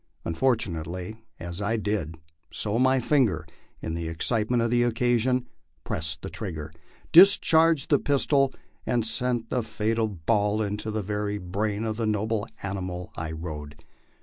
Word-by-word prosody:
Unfortunately 90 -1 -1 0.2
as 85 +3 -6
I 110 +3 0
did 100 -7 -2 0.3
so 105 +3 -1
my 130 +1 +4
finger, 115 - +2 0.4
in 80 - -3
the 85 0 -3
excitement 110 +8 +1
of 115 - 0
the 120 0 +3
occasion, 120 +1 +1 0.4
pressed 80 +1 -3
the 95 - -4
trigger, 80 -7 -5 0.4
discharged 165 -5 +6
the 145 - +5
pistol, 140 -1 +2 0.3
and 120 -3 0
sent 120 0 -1
the 125 - +1
fatal 110 +1 -1
ball 105 +3 0
into 105 +1 -2
the 110 -1 -2
very 105 +1 -2
brain 100 +3 -2
of 110 -1 -2
the 115 -2 -1
noble 110 0 -1 0.2
animal 95 -2 -4
I 80 0 -4
rode. 75 -2 -6
110 Hz, 145 wpm, -26 LUFS, 90-120 Hz, 0.4 s, discharged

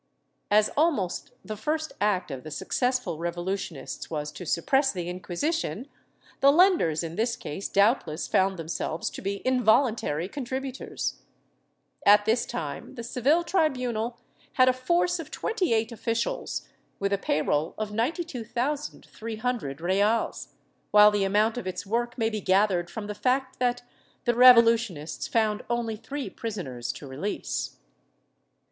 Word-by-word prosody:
As 210 +1 +4
almost 285 - 0
the 215 - -4
first 310 +8 -2
act 200 -6 +1
of 130 -2 -6
the 155 - -7
successful 245 - -1
revolutionists 175 -3 -4
was 150 -2 -3
to 175 +2 -9
suppress 270 - +2
the 175 -3 -4
Inquisition, 210 - -2 0.5
the 275 - +6
lenders 310 - +4
in 165 0 -6
this 230 +2 +1
case 190 +7 -5
doubtless 200 - +2
found 190 0 +2
themselves 165 0 -3
to - - -8
be 200 0 -4
involuntary 230 - +2
contributors.^ 265 +2 -4 0.8
At 205 0 +6
this 230 +2 +1
time 145 - -5
the 235 - -6
Seville 265 +8 +2
tribunal 250 - 0 0.4
had 255 -3 +5
a 255 - +5
force 345 +7 +1
of 315 -2 -7
twenty 405 - -1
eight 225 +1 +1
officials, 230 0 -2 0.3
with 200 0 -1
a 200 - +1
pay 155 -5 0
roll 150 +2 0
of 215 -1 -3
92,300 240 - -3
reales, 200 +6 +1 0.4
while 210 0 +8
the 205 -1 +1
amount 215 +4 +2
of 185 - -7
its 185 - -4
work 235 +4 -1
may 225 -1 +1
be 215 -1 -3
gathered 185 -2 +2
from 215 +3 -6
the 210 - -4
fact 260 +4 0
that 245 -1 0 0.4
the 240 - +3
revolutionists 230 -9 +5
found 215 -2 +1
only 235 -2 -1
three 280 +6 -5
prisoners 160 - -5
to - - -10
release. 140 +10 -4
220 Hz, 140 wpm, -27 LUFS, 185-255 Hz, 0.8 s, while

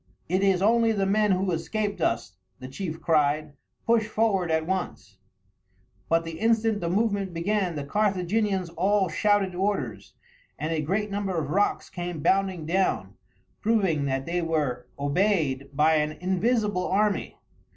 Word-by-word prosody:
"It 185 +3 +1
is 195 -2 +2
only 230 +1 +4
the 200 -2 0
men 210 +2 +2
who 185 0 0
escaped 205 +3 -2
us," 115 -7 0 0.2
the 130 - -9
chief 160 +3 -5
cried; 150 -1 +1 0.3
"push 230 -2 +3
forward 210 -5 +1
at 160 0 +1
once." 170 - -4 0.9
But 165 0 +2
the 165 -1 -7
instant 225 -1 +2
the 170 - -1
movement 200 -2 0
began 185 0 0
the 145 - -3
Carthaginians 195 +1 0
all 195 0 +1
shouted 200 +2 +1
orders, 145 - -3 0.4
and 155 +3 -2
a 155 - 0
great 200 +7 -1
number 200 -3 -2
of 150 -3 -2
rocks 205 +4 0
came 175 -4 -5
bounding 190 -4 +1
down, 185 +4 0 0.5
proving 190 -10 +1
that 135 -1 -1
they 175 +1 -1
were 145 -7 -1
obeyed 145 -3 0
by 155 +3 +3
an 150 0 0
invisible 190 +3 0
army. 205 +2 0
185 Hz, 150 wpm, -26 LUFS, 155-205 Hz, 0.9 s, only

